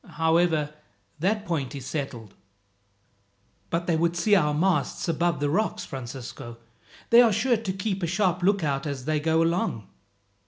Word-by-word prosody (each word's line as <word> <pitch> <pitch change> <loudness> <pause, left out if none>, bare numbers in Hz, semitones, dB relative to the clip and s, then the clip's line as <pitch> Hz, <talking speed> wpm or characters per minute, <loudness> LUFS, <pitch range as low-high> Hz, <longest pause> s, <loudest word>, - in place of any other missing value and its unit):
However, 160 -2 +2 0.5
that 205 +5 0
point 145 -6 -2
is 135 -2 -7
settled." 125 -8 -5 1.4
"But 170 +1 -1
they 170 - +1
would 170 +1 +1
see 205 +5 +2
our 150 -7 +4
masts 160 +1 0
above 170 -2 0
the 145 - 0
rocks, 215 +7 -1
Francisco. 120 -2 -8 0.5
They 235 +1 +9
are 235 -2 +5
sure 240 +4 +2
to 215 -3 -3
keep 190 +1 -3
a 170 - 0
sharp 185 0 +1
lookout 160 -7 +1
as 135 -3 -5
they 155 0 +1
go 160 +2 +2
along." 165 - -1
165 Hz, 155 wpm, -26 LUFS, 145-185 Hz, 1.4 s, They